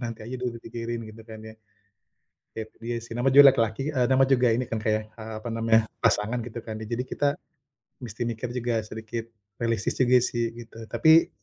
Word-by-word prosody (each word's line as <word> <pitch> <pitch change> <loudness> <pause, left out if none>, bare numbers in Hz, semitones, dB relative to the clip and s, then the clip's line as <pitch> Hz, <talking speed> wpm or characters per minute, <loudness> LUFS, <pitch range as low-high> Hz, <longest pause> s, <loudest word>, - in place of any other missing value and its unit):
nanti 115 -2 -5
aja 125 +3 -5
dulu 125 -2 -3
dipikirin, 115 0 -5
gitu 115 - -13
kan 110 -1 -9
ya. 110 0 -10 1.0
Ya - - -3
itu - - -36
dia 120 0 -2
sih, 115 - -10
namanya 125 +2 +2
juga 140 - +10
laki-laki, 115 -1 0
e - - +2
nama 135 +1 +5
juga 125 -2 +4
ini 120 +3 0
kan, 115 - -2
Kak, 110 - +2
ya, 110 - -3
eee, 110 +1 -10
apa 120 - -6
namanya? 115 0 +3 0.2
Pasangan 110 +4 +2
gitu 120 0 -7
kan. 110 -1 -7
De 110 - -6
jadi 120 +3 -2
kita 145 - 0 0.8
mesti 115 -1 -8
mikir 115 +1 -4
juga 120 -1 -1
sedikit 110 +1 -6 0.3
realistis 115 -2 -1
juga 125 -1 +5
sih, 120 -1 -1
gitu. 115 -1 -12
Tapi 160 +9 +5
115 Hz, 205 wpm, -26 LUFS, 110-125 Hz, 1.0 s, juga